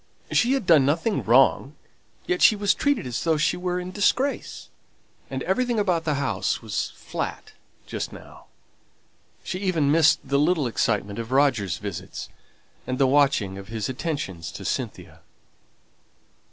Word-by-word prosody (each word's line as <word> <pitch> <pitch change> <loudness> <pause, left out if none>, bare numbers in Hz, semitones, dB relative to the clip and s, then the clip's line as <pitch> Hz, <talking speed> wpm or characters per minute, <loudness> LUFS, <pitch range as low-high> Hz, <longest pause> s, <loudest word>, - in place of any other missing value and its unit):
She 245 +2 +3
had 270 -7 -1
done 160 -5 +6
nothing 165 +10 +1
wrong; - - +3 0.5
yet 370 -1 -1
she 215 - +7
was 205 -1 +2
treated 285 - 0
as 120 -3 -3
though 160 -2 +2
she 155 +3 +1
were 180 0 -2
in 180 0 -6
disgrace. 255 +8 -1 0.6
And - - -4
everything 250 -2 0
about 180 -5 0
the 150 -2 +1
house 140 - -1
was - - -3
flat - - -6 0.3
just - - -5
now. - - -13 1.0
She 185 - -4
even 170 -7 +1
missed 160 0 +5
the 140 0 0
little 155 -1 +2
excitement 105 -3 -1
of 115 +1 -6
Roger's 125 - +2
visits, 95 -2 -7 0.6
and 130 - -2
the 135 - +4
watching 130 -8 +2
of 95 - -10
his 110 +1 -4
attentions 130 - -4
to - - -8
Cynthia. - - -4
145 Hz, 150 wpm, -24 LUFS, 120-185 Hz, 1.0 s, she